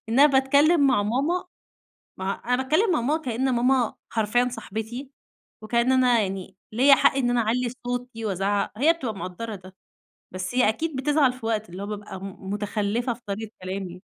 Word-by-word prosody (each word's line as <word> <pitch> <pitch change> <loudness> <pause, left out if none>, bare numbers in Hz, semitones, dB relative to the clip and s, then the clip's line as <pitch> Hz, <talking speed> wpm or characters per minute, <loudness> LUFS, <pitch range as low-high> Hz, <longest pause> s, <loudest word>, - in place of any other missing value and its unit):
إن 230 - +1
أنا 290 - +9
باتكلَّم 280 +4 +4
مع 255 -6 +3
ماما 280 - 0 0.7
ما 190 +1 -1
أنا 250 +1 -1
باتكلَّم 360 +10 +2
مع 320 - +2
ماما 295 +7 0
كإن 255 0 0
ماما 245 -1 +2 0.2
حرفيًا 230 +3 +2
صاحبتي، 240 +4 -6 0.5
وكأن 235 +3 +1
أنا 250 -3 +4
يعني 190 -2 -4 0.2
ليَّ 270 +5 +6
حق 265 - +3
إن 245 -3 +1
أنا 245 - +2
أعلِّي 240 +3 0 0.2
صوتي 245 -2 -4
وأزعَّق. 200 0 0
هي 310 +5 +5
بتبقى 260 -10 -5
مقدِّرة 200 +4 -6
ده، 185 0 -15 0.6
بس 185 +5 -5
هي 250 -4 +4
أكيد 310 +7 -2
بتزعَل 275 0 +2
في 255 -2 -10
وقت، 220 -3 -1
اللي 185 +3 -7
هو - - -5
بابقى 205 -2 -6
م 195 0 -8
مُتخلِّفة 210 +4 -1
في 235 - -16
طريقة 210 +2 -4
كلامي. 185 -1 -5
235 Hz, 180 wpm, -25 LUFS, 205-260 Hz, 0.7 s, أنا